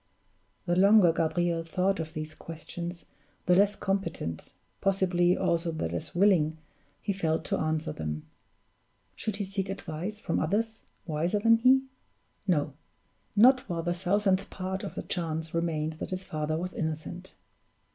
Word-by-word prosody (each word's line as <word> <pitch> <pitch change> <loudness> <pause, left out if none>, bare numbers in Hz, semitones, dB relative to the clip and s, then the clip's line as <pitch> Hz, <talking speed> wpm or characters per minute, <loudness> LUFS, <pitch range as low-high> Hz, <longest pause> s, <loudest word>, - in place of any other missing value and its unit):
The 175 -1 +1
longer 195 -2 +6
Gabriel 170 +1 +1
thought 185 +3 0
of 160 -1 -4
these 155 0 -3
questions, 170 +2 -6 0.4
the 180 - +4
less 200 +2 +4
competent 170 - -3 0.3
possibly 185 -2 +3
also 170 0 +1
the 160 - -2
less 85 - -5
willing 175 -5 +4 0.4
he 200 - -2
felt 165 -4 -1
to - - 0
answer 155 +1 -1
them. 75 -1 -4 0.9
Should 215 - -2
he 200 0 -2
seek 195 0 -3
advice 195 +2 -5
from 170 - -1
others 220 +7 0 0.2
wiser 165 +4 0
than 230 +2 +5
he? 260 +3 +5 0.6
No; 150 -5 +1 0.6
not 250 +2 +6
while 165 -1 -2
the 175 0 0
thousandth 190 +2 +1
part 190 0 -4
of - - -6
a - - -3
chance 160 -3 -3
remained 160 -2 -1
that - - -4
his 185 0 -3
father 155 -2 -2
was 180 +2 -3
innocent. 160 +3 -4
175 Hz, 145 wpm, -29 LUFS, 160-195 Hz, 0.9 s, longer